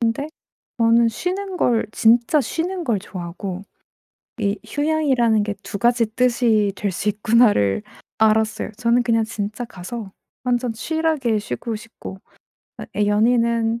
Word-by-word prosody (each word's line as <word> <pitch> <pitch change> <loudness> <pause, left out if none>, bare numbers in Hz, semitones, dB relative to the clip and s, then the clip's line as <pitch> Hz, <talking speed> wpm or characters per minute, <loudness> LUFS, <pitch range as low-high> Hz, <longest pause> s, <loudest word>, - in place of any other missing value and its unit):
근데 230 +5 0 0.5
저는 230 0 +4
쉬는 370 - -3
걸 230 -2 +2
진짜 235 +6 +4
쉬는 345 +5 -3
걸 225 -5 +1
좋아하고 185 +1 -6 0.8
'이 205 -1 0
휴양이라는 270 -7 +2
게 210 - -2
2 - - -5
가지 240 0 +3
뜻이 235 -5 +2
될 200 0 -2
수 195 - -4
있구나.'를 210 - +3 0.4
알았어요. 220 0 +2
저는 240 +1 +2
그냥 230 -2 +2
진짜 215 +1 -4
가서 200 +1 -8 0.3
완전 245 -1 0
chill하게 305 -5 0
쉬고 225 +2 -4
싶고 225 -3 -10 0.6
어 - - -6
애 205 0 +2
연인은 230 +1 +2
230 Hz, 275 characters per minute, -21 LUFS, 210-245 Hz, 0.8 s, 저는